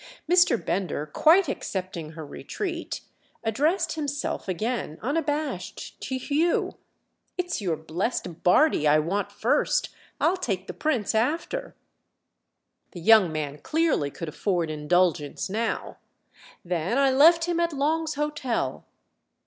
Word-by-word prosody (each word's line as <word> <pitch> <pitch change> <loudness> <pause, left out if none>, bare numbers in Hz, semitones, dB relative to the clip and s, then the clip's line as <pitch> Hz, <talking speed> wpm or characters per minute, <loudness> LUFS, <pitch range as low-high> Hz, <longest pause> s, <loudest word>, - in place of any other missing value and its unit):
Mr. 350 -6 +5
Bender, 180 -8 -2
quite 320 - +4
accepting 185 - -4
her 160 -1 -7
retreat, 345 - -5 0.4
addressed 295 - +1
himself 290 -7 -3
again 205 -3 -2
unabashed 290 - -3
to 260 - -3
Hugh: 300 +6 0 0.6
"It's 355 -8 -2
your 175 -5 -1
blest 170 +2 -3
Bardi 180 - +4
I 150 +1 +6
want 175 +7 -1
first—I'll 380 -7 0
take 195 - -2
the - - -6
Prince 260 -10 0
after." 325 - -1 1.2
The 175 - -8
young 215 -2 +6
man 150 -2 -4
clearly 310 - +1
could 165 +3 -6
afford 170 -1 -1
indulgence 155 +2 0
now. 225 +2 -2 0.7
"Then 175 +6 -1
I 275 -1 +4
left 330 +5 +6
him 345 -1 -1
at 340 0 +1
Long's 310 +2 0
Hotel." 295 -4 -2
230 Hz, 115 wpm, -26 LUFS, -, 1.2 s, I